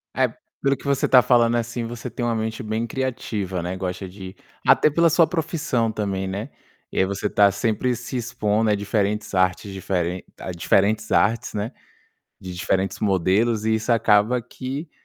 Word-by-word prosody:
É, - - +3 0.3
pelo 135 0 +2
que - - -16
você 140 -1 +1
tá 125 -1 +7
falando, 120 -1 +4
assim, 115 0 -2
você 120 +1 -6
tem 120 +2 -5
uma 115 -1 0
mente 110 +2 -3
bem 110 +1 -2
criativa, 110 -7 -3
né, 90 +1 -3
gosta 95 0 -4
de 95 0 -10 0.3
até 155 - +5
pela 170 +2 +3
sua 165 +2 +5
profissão 150 -9 -1
também, 95 -3 -2
né. 100 +8 -4 0.4
E - - -2
aí 95 - +4
você 100 +2 -2
tá 100 -1 +4
sempre 115 +5 0
se 120 +3 -7
expondo 110 -2 0
a 105 - +3
diferentes 105 +1 -1
artes 95 +1 +1
diferentes 90 -1 -2
a 95 - -5
diferentes 100 +5 +1
artes, 115 +3 +2
né, 105 +5 -2 0.7
de 95 -1 -7
diferentes 95 +2 -1
modelos 105 +3 +1
e 110 0 +2
isso 115 +2 0
acaba 115 +2 +3
que 135 +7 -6
110 Hz, 175 wpm, -23 LUFS, 95-120 Hz, 0.7 s, tá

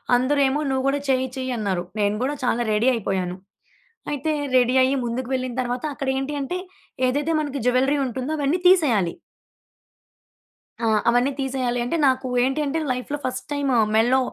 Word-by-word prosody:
అందరు 260 +4 +2
ఏమో 275 +3 0
"నువ్వు 265 -1 0
కూడా 285 +1 +1
చెయ్యి 260 0 +2
చెయ్యి 260 0 -3
అన్నారు." 190 -5 -1 0.2
నేను 205 0 +1
గూడా 290 +2 -1
చాలా 240 -1 +1
రెడీ 220 +4 +2
అయిపోయాను. 190 -4 -2 0.8
అయితే 295 +2 -1 0.3
రెడీ 250 0 +3
అయ్యి 265 +2 +3
ముందుకు 240 +2 -3
వెళ్ళిన 255 -1 -2
తరువాత 245 0 -3
అక్కడ 275 -1 -3
ఏంటి 270 +2 -3
అంటే 355 +7 -3 0.5
ఏదైతే 290 +5 0
మనకి 285 -2 -3
జ్యువెల్లరీ 265 +3 +3
ఉంటుందో 260 +4 -3
అవన్నీ 285 +4 +1
తీసేయాలి. 245 - +4 1.7
ఆ! - - +2 0.2
అవన్నీ 245 +3 +3
తీసేయాలి. 255 -2 -1
అంటే 295 - -1
నాకు 260 0 +1 0.2
ఏంటి 270 +4 0
అంటే 290 +3 -1
లైఫ్‌లో 250 +4 -3
ఫస్ట్ 255 0 -3
టైము 275 -4 +1 0.2
మెడలో 245 +4 +4
260 Hz, 160 wpm, -23 LUFS, 245-280 Hz, 1.7 s, తీసేయాలి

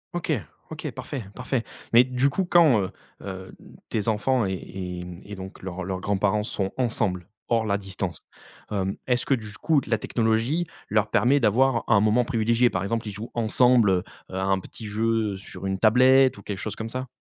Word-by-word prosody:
OK, 170 -2 -2 0.4
OK, - - -5
parfait, 130 -8 -6
parfait. 125 -1 -2 0.3
Mais 120 +2 +8
du 130 +2 +1
coup, 190 +5 -1
quand, 165 -10 +5
heu 95 - -3 0.3
heu, 95 -1 -7 0.4
tes 105 0 -2
enfants 115 +2 +2
et 95 - -1
et 90 -1 -6
mmh 90 +1 -9
et 105 0 -7
donc 95 +1 -9
leurs 95 0 -5
leurs 95 0 -4
grands-parents 100 +1 +1
sont 95 -2 -2
ensemble, 105 -8 -1 0.2
hors 115 -2 +2
la 100 -1 0
distance, 95 -3 -5 0.4
hem, 95 -2 -1
est-ce 125 -1 +1
que, 140 - +2
du 110 -4 -3
coup, 150 +4 +2
la 110 -1 +2
technologie 115 +10 0 0.2
leur 105 0 +2
permet 140 +4 +3
d'avoir 120 +2 +3
un 105 -3 +5
moment 110 +4 +3
privilégié? 115 +2 +2
Par 95 0 -2
exemple, 115 +2 -2
ils - - -3
jouent 105 +4 -8
ensemble, 115 -5 +3 0.3
à 95 0 -3
un 95 0 +2
petit 110 +4 -11
jeu, 110 0 0
heu, - - -6
sur 95 0 -9
une 95 0 -1
tablette 130 +3 +5
ou 100 - -12
quelque 100 -2 -5
chose 110 - -4
comme 110 0 -5
ça? 130 +1 -4
110 Hz, 195 wpm, -25 LUFS, 95-125 Hz, 0.4 s, Mais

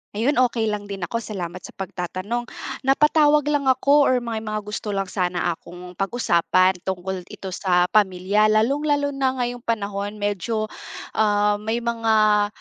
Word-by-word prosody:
Ayun, 250 +6 +1
okey 230 -3 +2
lang 205 -1 -4
din 195 -3 -6
ako, 230 +7 -2
salamat 185 -5 -6
sa - - -12
pagtatanong. 195 +6 -4 0.4
Napatawag 300 +1 +4
lang 285 -2 0
ako 280 +2 +4
or 255 - +3
may 230 -2 -3
mga 215 -1 -4
gusto 210 0 -4
lang 195 - +1
sana 180 -2 0
akong 180 +2 -10
pag-usapan, 185 -3 +2
tungkol 185 -1 -4
ito 190 -1 -8
sa 180 -2 +1
pamilya, 200 +1 +3
lalong-lalo 285 +7 +2
na 265 -1 0
ngayong 245 -1 -2
panahon 205 -3 -3
medyo, 205 +1 -2 0.5
ah, 205 -1 +2
may 220 +3 -2
mga 220 -3 +3
215 Hz, 150 wpm, -23 LUFS, 190-240 Hz, 0.5 s, Napatawag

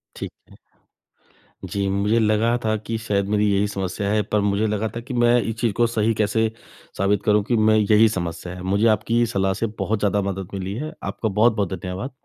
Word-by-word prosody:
ठीक - - -6 0.2
है। - - -16 1.2
जी 100 -1 -1
मुझे 100 +4 +1
लगा 110 +2 +2
था 110 0 +2
कि 110 +2 -4
शायद 105 -3 -1
मेरी 105 0 +2
यही 100 +1 +2
समस्या 100 0 -3
है 105 0 +2
पर 105 - +3
मुझे 100 +2 +1
लगा 105 +1 -1
था - - -3
कि, 130 +2 -8
मैं 120 0 +4
इस 115 -1 -3
चीज़ 115 -3 +1
को 120 +3 +2
सही 115 -1 +1
कैसे 110 +1 +1 0.5
साबित 100 +1 +1
करूँ 105 -1 +3
कि 120 +4 0
मैं 110 0 +4
यही 105 +1 +5
समस्या 85 -2 -4
है। 90 - -9
मुझे 100 +4 +2
आपकी 120 +2 0
सलाह 95 0 +1
से - - +2
बहुत 110 0 -1
ज़्यादा 105 0 +1
मदद 95 -1 -6
मिली 95 0 -4
है। 155 +6 -5
आपका 110 - -2
बहुत-बहुत 105 -2 +2
धन्यवाद। 95 +7 -5
105 Hz, 205 wpm, -22 LUFS, 100-115 Hz, 1.2 s, यही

